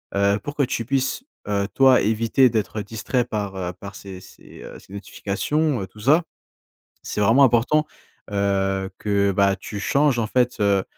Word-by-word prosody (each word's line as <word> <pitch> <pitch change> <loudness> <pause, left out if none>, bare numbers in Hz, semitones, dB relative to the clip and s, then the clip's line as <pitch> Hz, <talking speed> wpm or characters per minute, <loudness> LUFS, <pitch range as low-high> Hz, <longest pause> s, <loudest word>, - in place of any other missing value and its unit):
heu, 100 +1 +2
pour 145 +8 -7
que 145 - +2
tu 115 -2 -2
puisses, 135 - -1 0.2
heu, 100 -1 0
toi 130 -2 +5
éviter 115 +4 +3
d'être 110 -1 -2
distrait 115 +4 -2
par 100 -3 -4
heu, 90 -1 -4
par 100 +2 -11
ces 95 -2 -10
ces - - -15
heu, - - -10
ces 95 - -17
notifications, 120 +7 -2
heu, 95 - -5
tout 105 - -17
ça. 150 +10 +3 0.8
C'est - - -4
vraiment 115 +7 +5
important, 135 +5 +3 0.4
heu, 95 -1 0
que 100 -1 +1
bah, 100 0 +2
tu 105 - -7
changes 140 +3 +2
en 110 - -1
fait, 125 +2 0
heu 100 -2 +2
105 Hz, 175 wpm, -22 LUFS, 100-130 Hz, 0.8 s, toi